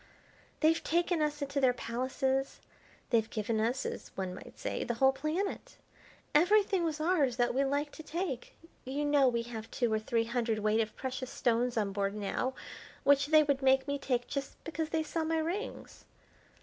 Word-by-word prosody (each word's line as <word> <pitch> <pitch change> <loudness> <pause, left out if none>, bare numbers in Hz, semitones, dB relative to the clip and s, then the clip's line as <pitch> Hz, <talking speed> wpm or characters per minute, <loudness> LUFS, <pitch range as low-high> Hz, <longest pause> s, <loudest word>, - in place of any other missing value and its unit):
They've 320 +1 +3
taken 340 0 +1
us 295 -1 0
into 280 0 -2
their 255 -2 +5
palaces, 265 +3 -1 0.5
they've 225 -2 +3
given 220 0 -1
us, 240 +5 0
as - - -5
one 190 -1 -2
might - - -11
say, - - -3
the 235 - -2
whole 265 +3 +5
planet. 310 +9 -3 0.6
Everything 385 +3 +4
was 315 -2 -1
ours 310 -7 +2
that 245 -1 +2
we 270 +2 +2
liked 285 +2 -1
to - - -7
take. 315 -5 -4 0.3
You 280 +3 -2
know 290 -2 +4
we 235 -2 +1
have 225 -2 -7
two 240 -3 0
or 215 - +2
three 225 +1 0
hundredweight 225 -2 0
of 215 -1 -4
precious 260 -1 -4
stones 240 0 +1
on 205 -2 +1
board 200 0 -1
now, 215 +5 -2 0.5
which 285 0 +4
they 310 0 +6
would 285 -2 0
make 265 0 +4
me 285 0 -1
take 245 -3 0
just 275 -1 -4
because 320 -1 -3
they 320 -1 0
saw 320 +1 -2
my 325 +1 0
rings. 350 +9 -4
270 Hz, 180 wpm, -32 LUFS, 235-310 Hz, 0.6 s, they